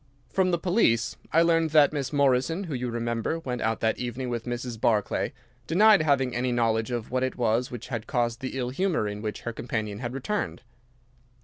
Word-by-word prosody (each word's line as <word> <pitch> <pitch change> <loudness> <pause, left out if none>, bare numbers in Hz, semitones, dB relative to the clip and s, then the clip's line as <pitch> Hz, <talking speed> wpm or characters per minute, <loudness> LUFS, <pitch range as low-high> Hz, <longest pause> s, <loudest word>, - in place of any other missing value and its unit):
"From 190 -1 +3
the 175 - +2
police 160 - +2 0.2
I 165 +2 +5
learned 165 -1 +3
that 150 -1 +5
Miss 140 -3 -2
Morrison, 140 +5 +2
who 165 -6 -5
you 125 -1 -2
remember 115 +5 -2
went 125 -7 -4
out 110 0 -1
that 110 0 +1
evening 125 +1 -3
with 120 -1 -3
Mrs. 120 -2 -4
Barclay, 105 -3 +1 0.4
denied 205 +2 +6
having 135 -5 +1
any 125 +1 0
knowledge 115 -2 +1
of 120 -2 -4
what 130 0 0
it 130 0 -1
was 120 +1 +1
which 120 0 -8
had 120 -4 -4
caused 120 -2 0
the 130 0 -4
ill 125 -1 -2
humour 170 - 0
in 105 0 -5
which 105 -1 -4
her 120 - -4
companion 110 -3 -3
had 120 0 -4
returned. 205 +7 -3
125 Hz, 200 wpm, -27 LUFS, 115-150 Hz, 0.4 s, denied